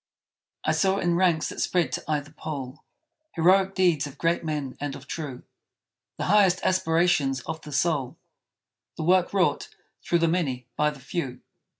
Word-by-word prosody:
I - - +3
saw, 195 0 +2
in 175 -3 +1
ranks 170 -3 +2
that - - -5
spread 175 -2 +1
to - - -3
either 150 -1 -2
pole, 150 -3 -7 0.5
Heroic 190 +3 +3
deeds 170 -7 +2
of 140 - -12
great 170 0 0
men 150 -5 -3
and 145 -1 -3
of 140 - -11
true; 140 -5 -6 0.7
The - - -3
highest 190 -2 +4
aspirations 165 -7 +2
of 160 +6 -6
the 150 - -10
soul; 145 -3 0 0.8
The - - -3
work 180 +2 +3
wrought, 190 -3 +1 0.3
through 170 - +2
the 165 0 +2
many, 145 -8 -1
by 150 0 +2
the 150 -2 -9
few! 135 -1 -4
160 Hz, 165 wpm, -26 LUFS, 145-180 Hz, 0.8 s, highest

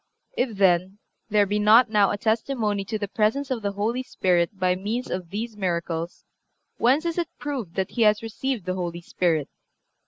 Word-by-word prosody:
If, 235 - -1
then, 190 0 +3 0.3
there 210 -1 +4
be 205 +2 -1
not 220 +3 +6
now 205 -2 +4
a - - -1
testimony 220 -2 0
to 215 +2 -3
the 205 -1 -3
presence 225 +7 0
of 245 -3 -1
the 200 -1 -2
Holy 220 +5 -1
Spirit 185 -6 0
by 185 -1 +2
means 215 +7 -3
of 180 -2 -4
these 220 +4 -4
miracles, 170 -3 -3 0.5
whence 270 +7 +3
is 335 +1 -1
it 340 - -2
proved 255 - -5
that 190 -1 -1
he 240 - -2
has 210 0 +4
received 225 -1 -3
the 185 - -1
Holy 175 -2 -4
Spirit? 165 -4 0
210 Hz, 185 wpm, -25 LUFS, 185-230 Hz, 0.5 s, not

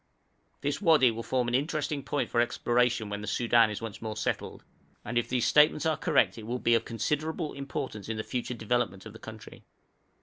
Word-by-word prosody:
This 145 +7 -2
wadi 155 - +5
will 115 +1 -5
form 125 +1 0
an 120 - -2
interesting 145 +2 -1
point 140 +2 -2
for 120 - +3
exploration 120 -1 +1
when 105 0 -4
the 105 - -7
Soudan 115 +1 +3
is 105 +1 -5
once 110 -3 -6
more 110 -1 -5
settled, - - -3 0.4
and 120 - -4
if 120 - +1
these 125 -2 +1
statements 150 +1 +4
are 160 -1 +2
correct 150 - +2
it 110 - -9
will 120 +2 -2
be 120 -1 +2
of 115 -1 +2
considerable 150 +6 -2
importance 135 -6 -5
in 110 - -2
the 110 - -2
future 125 0 -3
development 115 -3 -1
of 110 - -9
the 110 - -12
country. 110 -1 -11
120 Hz, 205 wpm, -29 LUFS, 110-140 Hz, 0.4 s, wadi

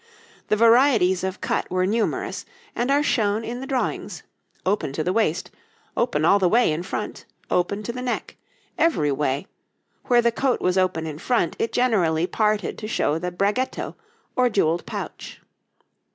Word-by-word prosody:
The - - +2
varieties 225 -5 +4
of 190 +1 -3
cut - - -1
were 185 0 +1
numerous, 220 +3 -1 0.3
and 240 +2 -1
are 285 +1 +3
shown 220 -5 +1
in 240 +2 -5
the 270 - -6
drawings 260 -2 -2 0.4
open 190 -7 0
to 155 - -2
the 180 - 0
waist, 190 -7 0 0.4
open 235 -11 +1
all 200 +4 +5
the 185 -2 +3
way 235 -4 +4
in 155 +2 -2
front, 180 - -5 0.2
close 180 0 +2 0.2
to 235 - -3
the 250 - -5
neck 250 -1 -3 0.4
every 155 - +2
way; 140 +3 -1 0.6
where 240 -2 +4
the 235 - +3
coat 260 +2 0
was 180 0 +1
open 185 -4 +1
in 155 -1 -6
front 235 -4 0
it 230 - 0
generally 180 -10 +2
parted 210 +2 0
to 215 - -5
show 160 -7 0
the 180 +1 -3
bragetto, 205 +8 -1 0.4
or 250 -1 +3
jewelled 170 -6 +1
pouch. - - -7
205 Hz, 165 wpm, -23 LUFS, 175-240 Hz, 0.6 s, all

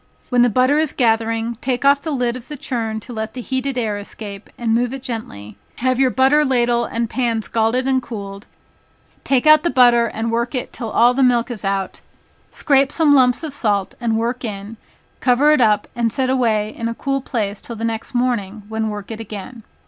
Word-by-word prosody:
When 245 -2 +3
the 245 - +5
butter 255 +6 +3
is 315 -2 0
gathering, 225 -1 0
take 255 0 -1
off 280 0 +5
the 320 - -5
lid 250 -4 -1
of 255 -1 -8
the 295 - -7
churn 230 -6 -3
to 245 - -9
let 220 0 -5
the 250 - -5
heated 260 +1 -3
air 215 -4 -1
escape, 205 0 -8
and 230 -2 0
move 245 +2 +1
it 265 - -9
gently, 165 - -7 0.2
have 255 0 0
your 265 -1 +4
butter 265 +4 +3
ladle 240 -3 +1
and 230 0 -2
pan 230 -2 -1
scalded 230 +4 0
and 260 -1 +2
cooled, 200 -4 -8 0.8
take 265 -1 +1
out 305 0 +7
the 345 - 0
butter 240 -4 +5
and 225 +1 -3
work 235 +3 -1
it 250 - -4
till 230 -3 -5
all 240 +3 +4
the 270 - 0
milk 245 -1 +2
is 220 -4 -7
out, 195 -1 -2 0.5
scrape 275 -1 +2
some 310 -3 +3
lumps 255 +1 +4
of 305 -3 -4
salt, 205 -7 0
and 225 -2 0
work 240 +3 -2
in, 210 0 -6 0.4
cover 265 +4 +4
it 300 - +3
up, 210 -2 +3
and 235 -1 0
set 260 +2 0
away 220 -5 +1
in 230 - -3
a 230 - -3
cool 275 +2 -2
place 210 -6 -3
till 235 - -7
the 225 - -7
next 230 +2 -3
morning, 225 -5 -1
when 220 0 -2
work 210 0 -7
it 225 - -6
again. 220 +2 -8
235 Hz, 210 wpm, -19 LUFS, 220-260 Hz, 0.8 s, out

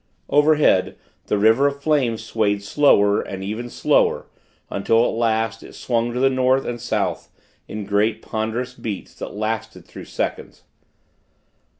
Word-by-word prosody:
Overhead, 150 -9 +3 0.3
the 105 - +1
river 110 +7 +4
of 140 0 -3
flame 140 -6 +1
swayed 105 -2 -1
slower, 105 -4 +3
and 95 -1 -7
even 110 +5 -5
slower; - - +1 0.5
until, 115 +4 +2
at - - 0
last, 115 -1 0
it - - -13
swung 120 -1 -1
to 125 - -3
the 135 - +4
North 130 0 +2
and 120 -1 -4
South 110 -5 -2 0.4
in 105 -1 -6
great, 105 +2 +1
ponderous 110 +3 -3
beats, 105 -6 -6
that - - -7
lasted 110 -4 -4
through - - -11
seconds. - - -5
115 Hz, 140 wpm, -21 LUFS, 105-125 Hz, 0.5 s, river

